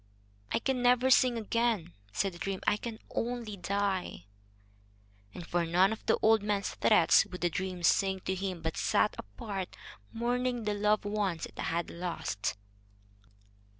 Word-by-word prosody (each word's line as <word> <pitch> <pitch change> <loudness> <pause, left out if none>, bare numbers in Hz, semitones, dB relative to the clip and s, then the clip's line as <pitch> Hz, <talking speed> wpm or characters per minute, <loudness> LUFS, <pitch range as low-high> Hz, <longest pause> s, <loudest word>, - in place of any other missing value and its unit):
"I - - +2
can 255 +1 -1
never 250 +1 +4
sing 250 -1 +5
again," 225 -5 0 0.2
said 195 - -1
the 175 - -11
dream. 195 0 -3
"I - - +4
can 225 +1 -6
only 235 -3 -3
die." 195 - -2 1.1
And 170 - -8
for 175 0 0
none 180 +5 +3
of 220 - -9
the - - +4
old 220 -1 +5
man's 205 -1 -1
threats 210 -7 +5
would 180 - -8
the 175 -1 +1
dream 180 +1 -4
sing 190 +3 +3
to 190 - -2
him, 185 -2 -4
but 160 0 -2
sat - - +2
apart, 185 - -6 0.3
mourning 245 +1 -1
the 210 -1 0
loved 210 +1 +1
ones 205 -5 -1
it - - -14
had 170 +1 -2
lost. 170 - -3
200 Hz, 155 wpm, -31 LUFS, 175-225 Hz, 1.1 s, sing